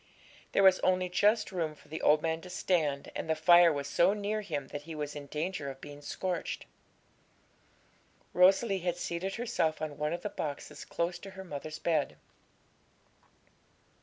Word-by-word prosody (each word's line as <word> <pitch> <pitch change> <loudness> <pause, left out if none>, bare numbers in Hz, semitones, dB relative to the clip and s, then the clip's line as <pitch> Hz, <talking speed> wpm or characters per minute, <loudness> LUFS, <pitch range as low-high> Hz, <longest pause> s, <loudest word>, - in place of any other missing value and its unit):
There 195 - +4
was 190 -1 +7
only 185 -1 +2
just 210 +4 +2
room 165 -4 -2
for - - -20
the 160 +2 -6
old 150 0 +4
man 160 0 -1
to 180 - -10
stand, 155 -6 0
and - - -4
the 160 - +3
fire 175 +2 +7
was 140 -2 -2
so 175 +3 +3
near 210 +1 -2
him 145 -9 -4
that 145 - -5
he 160 +2 -8
was 150 -1 -4
in 145 -1 -7
danger 155 -1 -3
of 135 0 -8
being 145 0 -10
scorched. 180 +4 -3 1.7
Rosalie 190 +3 +5
had 175 -1 -1
seated 175 +3 -3
herself 225 -10 0
on 150 -2 -5
one 150 0 0
of 170 - -4
the 210 - -2
boxes 145 -7 -5
close 175 +1 -2
to 195 - -9
her 190 - -6
mother's 155 -2 -6
bed. 150 - 0
170 Hz, 170 wpm, -31 LUFS, 150-185 Hz, 1.7 s, was